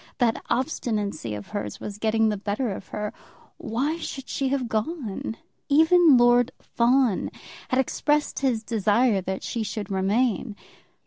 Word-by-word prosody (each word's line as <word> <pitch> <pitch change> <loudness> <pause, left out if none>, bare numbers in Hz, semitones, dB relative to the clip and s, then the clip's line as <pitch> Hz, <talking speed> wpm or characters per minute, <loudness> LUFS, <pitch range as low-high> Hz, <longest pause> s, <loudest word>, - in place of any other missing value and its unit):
That 240 -4 +1
obstinacy 215 - -1
of 105 -1 -8
hers 105 -1 -4
was 205 0 -7
getting 220 0 +2
the 210 - 0
better 205 +4 -2
of 190 - -7
her. 210 0 -4 0.4
Why 270 +9 -1
should 270 -5 -6
she 275 - -1
have 265 -2 0
gone? 225 - -3 0.3
Even 320 0 +6
Lord 240 0 +4
Fawn 240 -3 +2 0.4
had 255 - +1
expressed 295 +3 0
his 250 -5 0
desire 220 -1 +2
that 190 +1 -4
she 230 - -3
should 210 -2 -4
remain. 205 +3 0
230 Hz, 140 wpm, -25 LUFS, 205-260 Hz, 0.4 s, Even